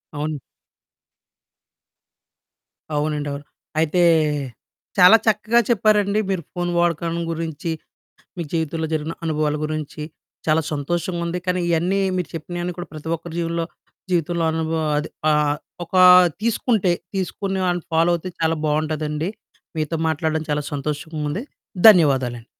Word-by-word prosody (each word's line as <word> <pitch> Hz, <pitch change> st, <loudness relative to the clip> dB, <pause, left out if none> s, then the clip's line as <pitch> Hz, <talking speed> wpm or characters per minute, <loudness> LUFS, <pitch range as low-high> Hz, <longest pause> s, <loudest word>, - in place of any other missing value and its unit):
అవును. 150 Hz, 0 st, -3 dB, 2.6 s
అవునండవును. 145 Hz, -1 st, -2 dB, 0.4 s
అయితే 160 Hz, +3 st, +2 dB, 1.0 s
చాలా 190 Hz, +4 st, +9 dB
చక్కగా 220 Hz, +2 st, +3 dB
చెప్పారండి. 210 Hz, -2 st, +3 dB
మీరు 185 Hz, -4 st, -1 dB
ఫోన్ 175 Hz, -1 st, -2 dB
వాడకాన్ని 170 Hz, 0 st, 0 dB
గురించి, 165 Hz, 0 st, -4 dB, 0.7 s
మీ 170 Hz, -, -2 dB
జీవితంలో 160 Hz, 0 st, -1 dB
జరిగిన 155 Hz, +1 st, -2 dB
అనుభవాల 150 Hz, -1 st, 0 dB
గురించి, 155 Hz, 0 st, -5 dB, 0.5 s
చాలా 155 Hz, +1 st, +3 dB
సంతోషంగుంది. 170 Hz, +3 st, -2 dB
కానీ 180 Hz, 0 st, 0 dB
ఇయన్నీ 175 Hz, +4 st, +1 dB, 0.2 s
మీరు 180 Hz, -, -2 dB
చెప్పినయన్నీ 175 Hz, +2 st, -4 dB
కూడా 175 Hz, -2 st, -6 dB
ప్రతి 155 Hz, +1 st, -7 dB
ఒక్కరి 165 Hz, 0 st, -9 dB
జీవలో 165 Hz, 0 st, -1 dB, 0.5 s
జీవితంలో 170 Hz, 0 st, 0 dB
అనుభవం 160 Hz, -1 st, -1 dB
అది, 150 Hz, +2 st, -2 dB, 0.8 s
ఒక 185 Hz, -, -7 dB, 0.5 s
తీసుకుంటే, 220 Hz, -4 st, +1 dB, 0.2 s
తీసుకుని 190 Hz, +1 st, -2 dB
వాళ్ళని 175 Hz, -1 st, 0 dB
ఫాలో 165 Hz, +2 st, +4 dB
అయితే 185 Hz, +2 st, -7 dB
చాలా 160 Hz, 0 st, +1 dB
బావుంటదండి. 155 Hz, +2 st, -1 dB, 0.5 s
మీతో 155 Hz, +1 st, -1 dB
మాట్లాడడం 160 Hz, 0 st, -1 dB
చాలా 150 Hz, 0 st, 0 dB
సంతోషంగుంది. 150 Hz, -, -3 dB, 0.5 s
ధన్యవాదాలండి. 130 Hz, -, +3 dB
165 Hz, 110 wpm, -22 LUFS, 155-175 Hz, 2.6 s, చాలా